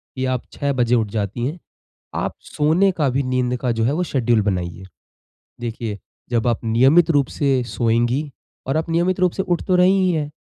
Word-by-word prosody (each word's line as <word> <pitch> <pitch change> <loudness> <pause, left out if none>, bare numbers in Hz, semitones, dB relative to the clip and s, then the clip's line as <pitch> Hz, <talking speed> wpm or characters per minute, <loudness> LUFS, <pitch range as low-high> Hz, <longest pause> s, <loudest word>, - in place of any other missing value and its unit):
कि 130 0 -2
आप 130 -1 -1
6 140 -1 -2
बजे 125 -1 +2
उठ 110 -3 +1
जाती 105 +2 -2
हैं। 165 +4 -5 0.6
आप - - -2
सोने 165 +6 +2
का 140 -3 +3
भी 135 +2 0
नींद 125 -1 0
का 125 - 0
जो 115 -1 -1
है 125 +5 +1
वो 175 +4 0
शेड्यूल 120 -8 +1
बनाइए। 95 -3 -2 0.8
देखिए, 115 -3 -4 0.3
जब 120 -1 0
आप 115 - 0
नियमित 135 +10 +4
रूप 145 -3 +3
से 135 -3 +2
सोएँगी 120 +5 0 0.4
और 135 - 0
आप 160 +1 -1
नियमित 175 +3 +1
रूप 180 -2 +3
से 190 - -2
उठ 175 -2 -1
तो 185 - +3
रही 180 +1 +5
ही 185 -1 +2
हैं। 150 -2 -2
130 Hz, 200 wpm, -21 LUFS, 115-160 Hz, 0.8 s, रही